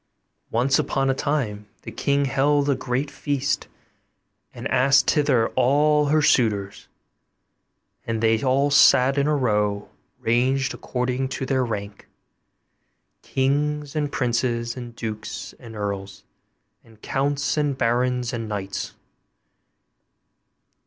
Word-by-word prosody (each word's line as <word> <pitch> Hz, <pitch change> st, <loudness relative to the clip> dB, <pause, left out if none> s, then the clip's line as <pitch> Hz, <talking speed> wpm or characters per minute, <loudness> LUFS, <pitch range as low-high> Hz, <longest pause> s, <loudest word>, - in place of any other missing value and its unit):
Once 130 Hz, +4 st, +2 dB
upon 135 Hz, 0 st, 0 dB
a -, -, +1 dB
time 125 Hz, -8 st, -2 dB, 0.2 s
the -, -, -7 dB
king 140 Hz, 0 st, 0 dB
held 140 Hz, +2 st, +2 dB
a 140 Hz, -, +3 dB
great 130 Hz, +2 st, -2 dB
feast, 140 Hz, -1 st, -2 dB, 0.8 s
and -, -, -6 dB
asked 135 Hz, +2 st, +4 dB
thither 140 Hz, -7 st, +2 dB
all 150 Hz, +3 st, +3 dB
her 155 Hz, +1 st, +2 dB
suitors; 105 Hz, -9 st, +1 dB, 1.2 s
and 115 Hz, -1 st, -1 dB
they 110 Hz, 0 st, +2 dB
all 135 Hz, +2 st, +2 dB
sat 135 Hz, -1 st, +5 dB
in 140 Hz, 0 st, +1 dB
a 150 Hz, -, +2 dB
row, 105 Hz, -6 st, 0 dB, 0.3 s
ranged 130 Hz, +3 st, +1 dB
according 125 Hz, +1 st, -2 dB
to 130 Hz, -, -4 dB
their 130 Hz, -1 st, +1 dB
rank 100 Hz, -3 st, -5 dB, 1.1 s
kings, 145 Hz, +2 st, -1 dB
and 145 Hz, -2 st, -1 dB
princes, 120 Hz, -2 st, -1 dB
and 120 Hz, -2 st, -8 dB
dukes, 110 Hz, -2 st, -6 dB
and 115 Hz, -3 st, -11 dB
earls, 100 Hz, -1 st, -5 dB, 0.6 s
and 110 Hz, -1 st, -21 dB
counts, 140 Hz, +1 st, -1 dB
and 145 Hz, -3 st, 0 dB
barons, 125 Hz, +1 st, 0 dB
and 115 Hz, -2 st, -4 dB
knights. 100 Hz, -2 st, -4 dB
130 Hz, 120 wpm, -23 LUFS, 115-140 Hz, 1.2 s, sat